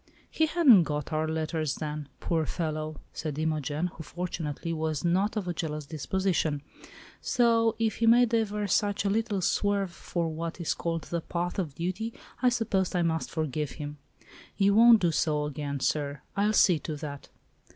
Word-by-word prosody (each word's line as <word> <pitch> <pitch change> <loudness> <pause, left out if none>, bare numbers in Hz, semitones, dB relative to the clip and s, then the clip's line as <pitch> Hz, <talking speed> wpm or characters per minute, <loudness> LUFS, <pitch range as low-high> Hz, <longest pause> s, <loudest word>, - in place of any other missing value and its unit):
"He 315 - +2
hadn't 280 - +6
got 150 +1 -3
our 155 0 0
letters 155 -1 -1
then, 150 -2 -5
poor 160 -3 0
fellow!" 155 -2 -3
said 155 -3 -4
Imogen, 155 0 -1
who, 165 -2 -6
fortunately, 165 -1 -4
was 160 -1 -2
not 195 +6 +1
of 200 -4 -2
a 175 - -1
jealous 155 -3 -4
disposition. 155 0 -1 0.6
"So 230 -2 +3
if 225 -2 0
he 230 - +2
made 235 0 +5
ever 210 -2 +1
such 205 +1 +1
a 200 - +2
little 215 -2 0
swerve 200 +1 +1
from 170 -1 -3
what 165 +2 -4
is 170 - 0
called 165 -1 -3
the 170 -1 -3
path 175 +3 -3
of 155 -7 -3
duty 185 +7 -3 0.3
I 250 - +5
suppose 205 -7 0
I 175 - +2
must 160 -1 -1
forgive 155 -2 -2
him. 145 -1 -7 0.6
You 200 0 +4
won't 230 +1 +7
do 175 -2 +3
so 150 -1 +1
again, 145 -1 -4
sir, 145 0 -1
I'll 210 +2 +2
see 180 -6 +5
to 155 0 -5
that!" 145 -1 -7
170 Hz, 170 wpm, -28 LUFS, 155-205 Hz, 0.6 s, won't